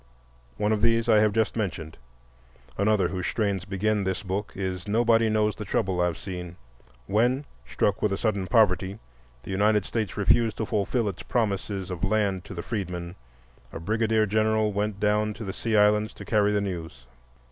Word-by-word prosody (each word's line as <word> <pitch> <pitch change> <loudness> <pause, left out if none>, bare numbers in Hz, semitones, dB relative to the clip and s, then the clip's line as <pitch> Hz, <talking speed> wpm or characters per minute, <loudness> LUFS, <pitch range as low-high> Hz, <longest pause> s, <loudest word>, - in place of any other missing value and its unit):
One 105 +1 +1
of 110 -1 +1
these 115 0 +3
I 110 -2 +6
have 105 0 +4
just 110 +1 0
mentioned. 90 -7 -3 0.8
Another 100 -3 +2
whose 90 0 -3
strains 100 -4 -1
begin 105 +1 0
this 95 +2 -2
book 100 +2 -3
is 95 -1 -4
"Nobody 115 +1 +3
knows 105 0 +1
the 105 - -6
trouble 95 -2 0
I've 90 -3 0
seen." 90 -2 -7 0.5
When, 120 +8 +1 0.2
struck 100 +9 0
with 105 - +1
a 100 - 0
sudden 100 -4 -1
poverty, 100 -3 +2 0.5
the - - -7
United 105 +1 +2
States 110 -4 -3
refused 110 +2 +3
to 110 - -1
fulfill 110 +2 0
its 95 -4 -4
promises 100 -4 -2
of 90 0 -5
land 100 -2 +1
to 95 - -8
the 85 - -5
freedmen, 90 -5 -4 0.6
a - - -6
brigadier 110 +4 +1
general 110 0 +1
went 105 0 -2
down 105 +1 +1
to 115 - -7
the 95 -2 -4
Sea 110 +1 0
Islands 105 +1 +3
to - - -10
carry 105 -2 +2
the 105 0 +1
news. 85 -9 -6
105 Hz, 180 wpm, -26 LUFS, 95-110 Hz, 0.8 s, I